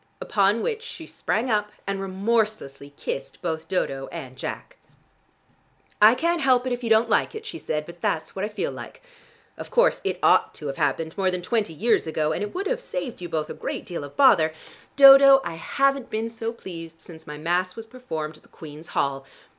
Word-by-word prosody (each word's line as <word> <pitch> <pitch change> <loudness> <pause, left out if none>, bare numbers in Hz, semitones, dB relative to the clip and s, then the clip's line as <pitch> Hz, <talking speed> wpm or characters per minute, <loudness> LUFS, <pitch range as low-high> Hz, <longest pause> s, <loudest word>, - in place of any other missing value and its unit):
Upon 205 +2 +1
which 445 -2 -2
she 405 -8 -9
sprang 240 -4 -2
up 210 -1 0
and 195 0 -3
remorselessly 195 -8 -1
kissed 135 - -5
both 160 -2 -4
Dodo 135 -7 -2
and 130 0 -8
Jack. - - -7 1.2
"I 215 +3 +8
can't 335 +5 0
help 255 -2 +3
it 255 - -1
if 245 0 -5
you 230 - -2
don't 225 +1 +4
like 230 - +1
it," 440 0 -7
she 390 -7 -7
said; 150 0 -3
"but 170 +1 -12
that's 160 - -2
what 195 - -3
I - - 0
feel 210 - -3
like. - - -10 0.6
Of - - -7
course - - +3
it - - -1
ought - - +4
to 150 - -9
have 135 -1 -4
happened 160 -1 -1
more 190 -1 +2
than 180 -1 -3
twenty 215 -7 -1
years 215 +1 +1
ago, 155 -1 0
and - - -2
it 205 0 -3
would 385 +2 -2
have - - -1
saved 285 - -5
you 175 - -6
both 155 -1 -2
a - - -4
great - - -5
deal 170 -4 -5
of 145 - -11
bother. 170 - +5 0.4
Dodo, 275 0 +9
I - - -3
haven't 275 +9 0
been 225 +1 -3
so 225 0 -4
pleased 165 -7 -10
since 160 -2 -13
my 150 0 -7
mass 180 +4 -1
was 225 - -8
performed 160 -11 -6
at - - -18
the - - -24
Queen's 155 +1 -11
Hall. 140 -1 0
200 Hz, 210 wpm, -24 LUFS, 160-250 Hz, 1.2 s, Dodo